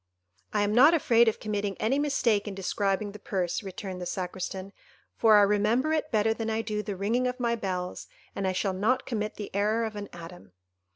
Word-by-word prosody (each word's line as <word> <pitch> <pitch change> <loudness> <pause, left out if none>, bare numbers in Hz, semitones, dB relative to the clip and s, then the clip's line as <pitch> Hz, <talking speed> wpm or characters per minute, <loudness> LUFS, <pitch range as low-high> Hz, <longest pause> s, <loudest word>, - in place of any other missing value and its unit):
"I 210 -1 +1
am 205 +1 0
not 290 +8 +7
afraid 235 -6 +4
of 225 - +1
committing 205 -2 -3
any 255 +6 +1
mistake 235 -8 +1
in 200 - -5
describing 195 +1 -1
the 210 - -11
purse," 185 -2 -2
returned 190 -2 -7
the 180 - -4
Sacristan, 190 +1 -5 0.4
"for 220 -2 +6
I 205 - +7
remember 215 +9 +2
it 310 -1 -1
better 220 -1 +2
than 225 0 -4
I 220 0 -1
do 210 -1 -2
the 205 -2 -5
ringing 225 +7 0
of 250 +1 -4
my 235 -1 +1
bells, 185 -4 -4 0.3
and 195 - -1
I - - +2
shall 190 +1 -1
not 215 +7 +1
commit 215 -3 -3
the 205 - -7
error 215 +3 +1
of 220 -1 -5
an 205 -1 -6
atom." 170 - -11
210 Hz, 210 wpm, -28 LUFS, 195-230 Hz, 0.4 s, not